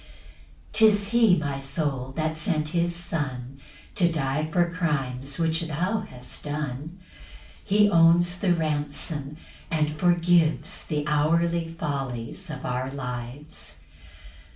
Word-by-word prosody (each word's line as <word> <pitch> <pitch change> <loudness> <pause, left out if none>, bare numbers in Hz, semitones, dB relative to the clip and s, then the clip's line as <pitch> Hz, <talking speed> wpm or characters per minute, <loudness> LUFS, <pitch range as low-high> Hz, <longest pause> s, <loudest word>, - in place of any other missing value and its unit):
3 220 - +7
'Tis 205 -1 0
he, 225 -5 +5
my 145 -3 -2
soul, 135 -2 -2
that 155 0 0
sent 155 -1 -1
his 170 +1 0
Son 135 -6 -4 0.3
To 175 -3 +3
die 155 0 -1
for 175 +1 +2
crimes 140 -6 -1
which 165 0 +1
thou 180 +8 0
hast 125 0 -9
done; 150 +2 -4 0.7
He 205 +1 +4
owns 175 -1 +4
the 180 -4 +3
ransom; 150 -1 -2 0.3
and 155 -2 +1
forgives 170 0 +2
The 150 -2 -1
hourly 165 +3 +2
follies 140 0 -4
of 150 -3 -6
our 125 +1 -1
lives. 125 +2 -6
155 Hz, 120 wpm, -26 LUFS, 140-170 Hz, 0.7 s, 3